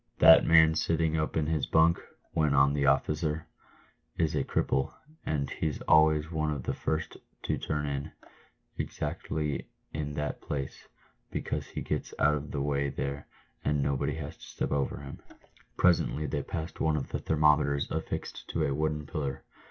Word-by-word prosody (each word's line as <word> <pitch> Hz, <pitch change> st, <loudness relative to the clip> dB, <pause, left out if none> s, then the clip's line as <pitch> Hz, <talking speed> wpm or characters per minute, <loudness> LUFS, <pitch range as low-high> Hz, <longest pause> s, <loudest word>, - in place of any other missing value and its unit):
"That 80 Hz, -, +9 dB
man 80 Hz, -1 st, +7 dB
sitting 80 Hz, 0 st, +1 dB
up 80 Hz, 0 st, -1 dB
in 80 Hz, -, +2 dB
his 75 Hz, -2 st, 0 dB
bunk," 80 Hz, +1 st, +4 dB, 0.3 s
went 75 Hz, -3 st, +2 dB
on 70 Hz, 0 st, +5 dB
the 70 Hz, -1 st, +1 dB
officer, 75 Hz, +3 st, +1 dB, 0.7 s
"is 80 Hz, -2 st, +1 dB
a -, -, +1 dB
cripple, 65 Hz, -, 0 dB, 0.4 s
and 70 Hz, -3 st, 0 dB
he's 80 Hz, -2 st, -2 dB
always 80 Hz, 0 st, +4 dB
one 80 Hz, -2 st, 0 dB
of 70 Hz, -4 st, -3 dB
the -, -, -1 dB
first 80 Hz, 0 st, -2 dB, 0.3 s
to -, -, 0 dB
turn 75 Hz, -1 st, -2 dB
in, 70 Hz, +1 st, -3 dB, 0.7 s
exactly 75 Hz, -3 st, -3 dB, 0.2 s
in 75 Hz, -1 st, -3 dB
that 75 Hz, 0 st, -3 dB
place, 70 Hz, -2 st, -5 dB, 0.4 s
because -, -, -3 dB
he -, -, -5 dB
gets -, -, -3 dB
out 75 Hz, 0 st, +4 dB
of 75 Hz, 0 st, -3 dB
the 70 Hz, -, -2 dB
way 70 Hz, -1 st, 0 dB
there, 70 Hz, +1 st, -4 dB, 0.4 s
and 75 Hz, -1 st, +1 dB
nobody 70 Hz, -1 st, 0 dB
has -, -, -6 dB
to -, -, -17 dB
step -, -, -4 dB
over 70 Hz, -1 st, -1 dB
him." 70 Hz, -1 st, -9 dB, 0.6 s
Presently 85 Hz, -3 st, +3 dB
they 75 Hz, 0 st, -1 dB
passed 80 Hz, +3 st, -5 dB
one 80 Hz, -1 st, +2 dB
of 70 Hz, -, -4 dB
the -, -, -2 dB
thermometers 75 Hz, -2 st, +2 dB
affixed -, -, -4 dB
to -, -, 0 dB
a 70 Hz, -, 0 dB
wooden 75 Hz, 0 st, -1 dB
pillar. 70 Hz, -2 st, -4 dB
75 Hz, 165 wpm, -29 LUFS, 70-80 Hz, 0.7 s, That